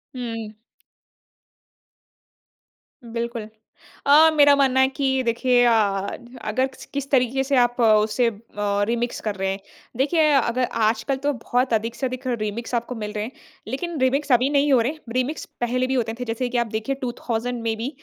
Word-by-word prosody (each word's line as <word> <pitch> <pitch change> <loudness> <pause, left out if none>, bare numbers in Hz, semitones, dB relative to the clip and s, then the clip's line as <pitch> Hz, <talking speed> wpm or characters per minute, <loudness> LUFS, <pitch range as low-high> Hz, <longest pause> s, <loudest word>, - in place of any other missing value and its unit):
हुँ। 225 -3 -5 2.5
बिल्कुल, 235 0 -4 0.7
अ, 305 +3 +7
मेरा 285 -1 +7
मानना 265 -2 +3
है 265 - +5
कि 265 -1 0
देखिए 245 +1 +2
अ, 240 - +5 0.7
अगर 260 +1 +1 0.3
किस 280 -1 -3
तरीके 265 0 +2
से 275 0 +1
आप 245 0 +2
उसे 215 +1 +3
अ, - - -2 0.6
रीमिक्स 240 +1 -1
कर 210 -2 -3
रहे 190 0 -1
हैं। 195 - -5 0.4
देखिए 305 +4 +3
अगर 255 -2 +2 0.2
आजकल 225 +4 -1
तो 285 +2 -1
बहुत 250 0 -1
अधिक 225 +2 -1
से 265 - -2
अधिक 255 +1 -5
रीमिक्स 230 0 -3
आपको 235 +2 -2
मिल 210 -2 -5
रहे 210 0 -3
हैं 230 - -6 0.4
लेकिन 315 +6 -4
रीमिक्स 270 +2 +1
अभी 250 +3 +4
नहीं 285 0 +3
हो 255 - +5
रहे 240 +5 0
हैं। 315 - -14 0.2
रीमिक्स 255 +5 -1 0.2
पहले 250 +2 0
भी 265 - -1
होते 230 -3 -1
थे 250 - -2
जैसे 235 +2 -2
कि 245 - -1
आप 235 - +1
देखिए 220 +5 -2
2000 240 -1 -3
में 225 -1 -1
भी 230 +3 -3
245 Hz, 175 wpm, -23 LUFS, 230-265 Hz, 2.5 s, अ